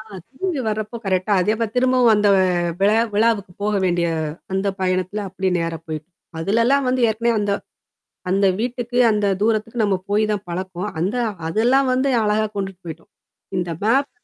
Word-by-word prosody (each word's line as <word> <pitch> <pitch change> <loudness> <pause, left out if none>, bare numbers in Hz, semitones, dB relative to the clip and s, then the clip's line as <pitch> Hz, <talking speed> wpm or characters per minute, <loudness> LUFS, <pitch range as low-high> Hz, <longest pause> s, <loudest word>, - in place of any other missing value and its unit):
ஆ - - -8 0.3
திரும்பி 330 0 -2
வரப்போ 215 +2 -3
கரெக்ட்டா 190 +2 0
அதே 210 +4 +2
போ - - +3
திரும்பவும் 250 -2 +4
அந்த 205 0 +3 0.5
விழா 205 +2 +4 0.2
விழாவுக்கு 210 -4 +1
போக 210 0 0
வேண்டிய 175 -1 +1 0.5
அந்த 190 +1 0
பயணத்தில 185 +2 -1
அப்டி 190 0 -2
நேரா 165 -1 -2
போய்ட்டோம். 155 +2 -6 0.3
அதுலலாம் 230 +10 +2
வந்து, 255 0 +1
ஏற்கனவே 230 +2 +1
அந்த 205 -1 0 0.8
அந்த 195 +1 +3
வீட்டுக்கு, 245 0 -3
அந்த 210 -1 +1
தூரத்துக்கு 225 +1 0
நம்ம 200 -2 +2
போய் 210 +1 +2
தான் 205 -1 -2
பழக்கம். 185 +2 -4
அந்த 195 +8 -1 0.3
அதெல்லாம் 245 +9 +2
வந்து 260 +2 +1
அழகா 215 +1 +1
கொண்டுட்டு 195 -2 -4
போய்ட்டோம். 160 -1 -9 0.5
இந்த 175 -1 -2
மேப் 270 +6 +2
210 Hz, 155 wpm, -21 LUFS, 185-235 Hz, 0.8 s, திரும்பவும்